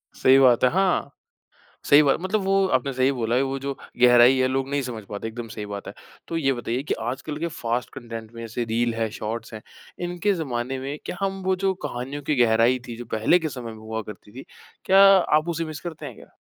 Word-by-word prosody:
सही 130 +1 +5
बात 125 -3 +5
है 125 - +6
हाँ। 190 0 +1 0.8
सही 145 +1 +8
बात 140 - +3
मतलब 195 +3 -1
वो 195 0 +2
आपने 140 - -5
सही 130 +2 +2
बोला 120 -2 -1
है 130 - +3
वो 135 0 -2
जो 140 0 -3 0.3
गहराई 120 +1 +7
है 130 - +2
लोग 135 +1 -2
नहीं 140 0 0
समझ 120 -4 -6
पाते, 105 +2 -5
एकदम 115 +1 -7
सही 110 -1 -7
बात 100 -1 -7
है। - - -7 0.3
तो 165 - -3
ये 135 -4 +1
बताइए 120 +2 -3
कि - - -1 0.2
आजकल 145 +3 -5
के 170 - -1
फ़ास्ट 120 -6 -3
कंटेंट 115 -3 -8
में 115 0 -8
ऐसे 115 +1 -3
रील 115 +1 0
है, 115 -1 -1
शॉर्ट्स 115 +1 -5
हैं। 110 - -7 0.5
इनके 185 +3 0
ज़माने 130 -5 -3
में 140 +3 -5
क्या 180 - -5
हम 195 0 -2
वो 190 0 +2
जो 190 - +3
कहानियों 135 +4 -5
की 150 +1 0
गहराई 115 +3 +3
थी 120 - -6
जो 120 - -8
पहले 140 +11 +3
के 160 -2 -3
समय 120 -4 -7
में 110 - -11
हुआ 110 0 -5
करती 105 -1 -12
थी, - - -10 0.4
क्या 190 +1 +5
आप 175 -4 +4
उसे 165 0 -2
मिस 155 -2 -7
करते 170 -3 -7
हैं - - -8
क्या? - - -16
130 Hz, 235 wpm, -24 LUFS, 115-155 Hz, 0.8 s, सही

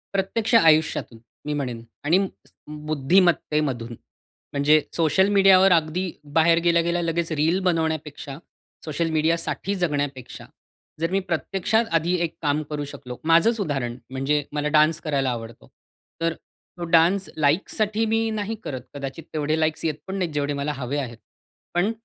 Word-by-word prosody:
प्रत्यक्ष 215 +4 -1
आयुष्यातून 155 - +3 0.3
मी 150 - -2
म्हणेन 125 -5 -4 0.2
आणि 165 +5 +4 0.3
स - - -24 0.4
बुद्धिमत्तेमधून 150 -5 +1
म्हणजे 145 +6 -1
सोशल 170 +4 +3
मीडियावर 195 -1 +6
अगदी 170 +2 +1 0.3
बाहेर 165 +1 +5
गेल्या-गेल्या 170 0 +2
लगेच 165 0 -1
रील 160 +5 +2
बनवण्यापेक्षा 160 -5 -2 0.5
सोशल 160 +2 -1
मीडियासाठी 165 +5 0
जगण्यापेक्षा 145 -7 -3 0.6
जर 165 +2 0
मी 195 - +2
प्रत्यक्षात 195 +7 0
आधी 165 +2 +2
एक 165 - -3
काम 150 0 +1
करू 145 -1 -3
शकलो. 130 -3 -9
माझंच 170 +8 +4
उदाहरण 135 -9 -2
म्हणजे 140 +3 0
मला 150 0 -1
डान्स 155 +2 +3
करायला 140 -4 0
आवडतं. 115 -1 -7 0.5
तर 165 0 +1
तो 175 +1 -14
डान्स 185 +4 +3
लाइकसाठी 205 +8 +1
मी 225 0 +1
नाही 210 +2 -3
करत 130 -4 -5
कदाचित 140 +2 -6
तेवढे 155 +1 0
लाईक्स 155 0 0
येत 155 -2 0
पण 190 - -4
नाहीत 175 -5 -2
जेवढे 145 0 -1
मला 150 - -1
हवे 135 +2 -3
आहेत. 120 -5 -4 0.6
पण 185 +6 +2
160 Hz, 140 wpm, -24 LUFS, 145-175 Hz, 0.6 s, मीडियावर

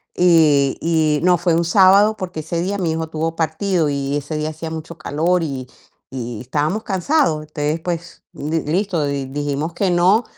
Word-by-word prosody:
Y 155 -6 +4
y 155 -3 +1
no, 180 -1 +4
fue 175 0 +1
un 170 - +2
sábado, 200 +4 +5
porque 180 -4 -5
ese 165 +2 -3
día 195 +3 -2
mi 175 -4 -1
hijo 160 0 -2
tuvo 160 +1 -3
partido 165 +1 0
y 140 0 -1
ese 145 +2 -5
día 155 0 -2
hacía 160 +1 -6
mucho 160 +1 -7
calor 165 +4 0
y 135 -5 -4 0.4
y 120 -4 -5
estábamos 150 - -1
cansados. 195 - +1
Entonces, 150 +1 -2
pues, 170 0 -5
m 155 +3 -3
m 150 -1 -3
listo, 180 -3 0
di 140 -1 -2
dijimos 145 +3 -3
que 190 +2 0
no. 185 +6 +4
160 Hz, 185 wpm, -19 LUFS, 150-180 Hz, 0.4 s, sábado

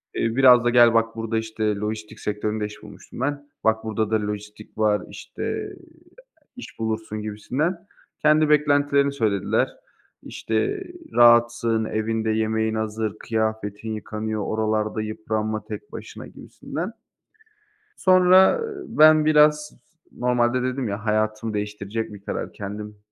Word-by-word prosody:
eee, 115 0 -1
biraz 125 -2 +7
da - - +4
gel 120 -1 +6
bak 115 0 +1
burada, 115 0 -2
işte, 110 -1 -1
lojistik 105 +1 -5
sektöründe 105 +1 -2
iş 105 0 -10
bulmuştum 105 0 -12
ben, 145 +2 -3
"Bak 110 0 +2
burada 110 -1 -2
da - - +3
lojistik 105 +1 -8
var, 105 -1 +2
işte, - - -9
eee, - - -4 0.8
iş 250 - -11
bulursun." 110 -1 -3
gibisinden. 125 - -2 0.4
Kendi 155 0 +4
beklentilerini 145 -1 +3
söylediler. 110 -7 0 0.5
İşte, 110 -1 -2 0.3
"Rahatsın, 120 -1 +4
evinde 110 +1 -2
yemeğin 110 0 0
hazır, 110 -1 -3
kıyafetin 110 -1 -3
yıkanıyor, 110 0 -4
oralarda 110 0 -1
yıpranma 110 0 -3
tek 105 -2 -8
başına." - - -9
gibisinden. 175 +7 -7 1.1
Sonra, 185 - +6
ııı, 430 -4 -6
ben 155 0 +6
biraz 150 0 +4
z - - -20 0.4
normalde 125 0 +1
dedim 130 -1 -2
ya, 100 +2 -5
hayatımı 110 +1 -1
değiştirecek 105 +1 -4
bir 100 - -11
karar, - - -4
kendim, 105 +1 -7
110 Hz, 130 wpm, -23 LUFS, 110-125 Hz, 1.1 s, biraz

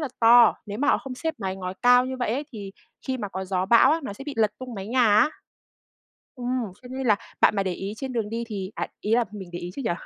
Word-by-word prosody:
là 300 - -2
to, 235 0 +7
nếu 205 +2 -6
mà 290 - +1
họ - - +4
không 265 -2 -7
xếp 320 +5 -3
mái 190 -2 -3
ngói 185 0 -5
cao 245 0 +6
như 260 0 -4
vậy 245 -4 -1
ấy 280 +4 -2
thì 200 -3 -7 0.3
khi 260 -1 -1
mà 205 -4 -4
có 190 0 -5
gió 185 -1 -1
bão 235 +2 +6
á, 330 - 0
nó 205 - -5
sẽ 270 +7 -10
bị 290 - -5
lật 220 -2 +3
tung 255 -2 -7
mái 195 -1 -6
nhà 250 -1 +3
á. 310 +6 +5 1.1
Ừm, 245 -4 -2
cho 250 - -11
nên 260 0 -4
là 210 -2 +5 0.2
bạn 210 - +5
mà 195 - +2
để 185 - -2
ý 195 +3 -5
trên 265 0 -5
đường 220 -3 -2
đi 230 +1 -3
thì 195 -2 -5
à, - - -3
ý 215 - +1
là 240 0 +3
mình 195 -4 -8
để 175 - -4
ý 175 0 -6
chứ 275 - -4
nhỉ? - - 0
230 Hz, 285 wpm, -25 LUFS, 195-255 Hz, 1.1 s, to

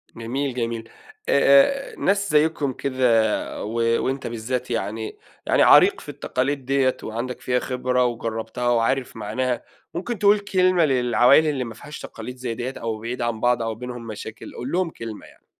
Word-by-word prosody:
جميل، 130 +4 -3
جميل، 115 -2 -3 0.4
آآ 140 - +4
آآ - - -13
ناس 200 0 +1
زَيِّكُم 150 -3 +2
كده 120 -5 +1
و 110 +2 -5 0.3
وأنتَ 135 +1 -2
بالذات 120 +2 -3
يعني 110 0 -3 0.3
يعني - - +3
عريق - - +6
في - - -11
التقاليد 135 +1 -2
ديّة 135 -1 +2
وعندك 120 +3 -4
فيها 125 0 +1
خبرة، 125 -1 0
وجربتها 115 0 -3
وعارف 120 +2 +1
معناها، 115 +3 -2 0.3
ممكن 205 +5 -4
تقول 205 0 +5
كلمة 185 -4 +3
للعوائل 125 +3 +4
اللي 140 -4 0
ما 115 -2 -7
فيهاش 150 +7 -10
تقاليد 125 +3 -8
زي 125 -2 -3
ديّة، 125 +3 -4
أو 110 -1 -3
بعيدة 120 +2 -3
عن 115 -2 -2
بعض 120 -1 +2
أو 115 -1 -2
بينهم 120 0 -7
مشاكل، 110 0 -8
قُل 125 +3 -5
لهم 180 -1 +1
كلمة 115 -7 -8
يعني. - - -20
125 Hz, 165 wpm, -23 LUFS, 115-140 Hz, 0.4 s, عريق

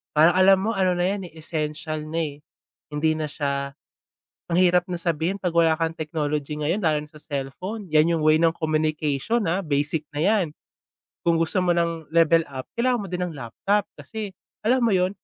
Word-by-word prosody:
parang 160 +3 +7
alam 195 +1 +7
mo 225 - +1
ano 185 -3 +1
na 175 - 0
'yan, 195 0 -1
eh, 165 - -19
essential 155 -1 -4
na, 165 +1 -1
eh, 145 -2 -4 0.5
hindi 155 +1 +1
na 155 - -1
siya 140 -2 -3 0.8
ang 170 - +3
hirap 180 -1 +4
na 175 -2 -4
sabihin 170 +3 -1
'pag 180 -2 -2
wala 165 -1 +5
kang 165 0 -1
technology 150 -1 -2
ngayon 170 +7 0
lalo 155 -2 +2
na 150 - -12
sa 155 - -14
cellphone 165 +10 -5
'yan 155 +2 +4
'yung 160 - -2
way 155 0 +6
ng 165 0 +3
communication, 155 - 0
ah, 185 +4 0
basic 145 +1 0
na 145 - -3
'yan. 200 +2 +3 0.8
Kung 170 - +5
gusto 165 +3 0
mo 175 -1 +2
ng 170 -2 -1
level 165 0 +4
up, 130 -2 -6
kailangan 245 0 +2
mo - - -5
din 180 0 -3
ng 170 - -7
laptop 145 - 0 0.2
kasi 215 -2 -6 0.3
alam 255 +4 +3
mo 215 - +3
'yun, 185 0 +2
165 Hz, 195 wpm, -24 LUFS, 150-180 Hz, 0.8 s, parang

